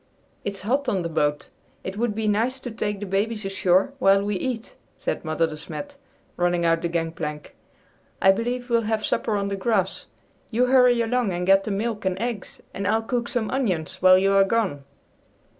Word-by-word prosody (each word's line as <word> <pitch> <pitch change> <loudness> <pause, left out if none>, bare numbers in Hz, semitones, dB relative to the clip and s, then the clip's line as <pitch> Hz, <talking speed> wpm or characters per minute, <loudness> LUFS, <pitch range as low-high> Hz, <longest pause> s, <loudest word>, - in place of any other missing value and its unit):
"It's 200 -1 -4
hot 260 +6 0
on 190 -6 0
the 170 - -3
boat. 150 -2 0 0.3
It 190 - -5
would 220 0 -1
be 220 0 -1
nice 230 +6 +1
to 245 - -6
take 205 -2 -3
the 205 - -4
babies 210 +2 -1
ashore 195 +5 +2
while 195 -4 +4
we 205 0 -1
eat," 235 +3 -4 0.2
said - - -3
Mother 160 +1 +1
De 160 -1 -5
Smet, 160 - -8 0.4
running 175 -1 +1
out 165 0 +2
the 170 - 0
gangplank. 165 -3 -4 0.6
"I 190 - +6
believe 245 +4 -2
we'll 230 0 +4
have 220 -1 0
supper 220 - 0
on 200 -1 -1
the 200 - -2
grass. 195 -2 -1 0.4
You 245 +2 +2
hurry 250 -2 +5
along 230 -3 0
and 175 +1 -2
get 195 +1 +4
the - - -3
milk 210 +2 -2
and 185 -1 0
eggs, 230 -4 -4
and 200 - -3
I'll 225 +1 +2
cook 240 +1 -2
some 235 -3 -2
onions 190 - -1
while 185 0 +7
you 195 +1 +3
are 195 0 +6
gone." 195 -9 -1
200 Hz, 195 wpm, -24 LUFS, 185-230 Hz, 0.6 s, while